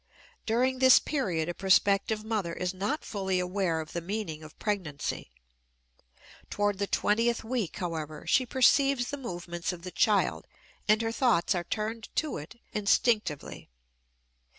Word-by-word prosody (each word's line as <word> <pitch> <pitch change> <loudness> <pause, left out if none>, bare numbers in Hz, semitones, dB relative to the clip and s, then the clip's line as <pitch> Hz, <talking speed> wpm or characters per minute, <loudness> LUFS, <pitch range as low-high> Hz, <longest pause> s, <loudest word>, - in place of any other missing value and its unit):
During 255 +3 +1
this 260 -1 +8
period 185 - -1
a 175 - -2
prospective 200 +3 +2
mother 215 -6 -2
is 180 +1 -2
not 205 +11 -2
fully 190 -3 -1
aware 180 -2 0
of 155 0 -7
the 170 - -2
meaning 175 -4 -4
of 155 -1 -13
pregnancy. 175 - -3 1.2
Toward 205 -1 0
the 200 - 0
twentieth 230 +4 +1
week, 225 -5 -2
however, 160 -4 -4
she 255 -1 +2
perceives 265 0 +3
the 285 - -3
movements 175 -8 -4
of 175 -2 -9
the 185 - -6
child 210 +1 +1 0.4
and 215 +1 +4
her 225 - -1
thoughts 230 -8 +2
are 175 -2 -2
turned 220 +2 -4
to 310 -2 -1
it 155 +10 -11
instinctively. 210 - 0
205 Hz, 145 wpm, -29 LUFS, 175-230 Hz, 1.2 s, this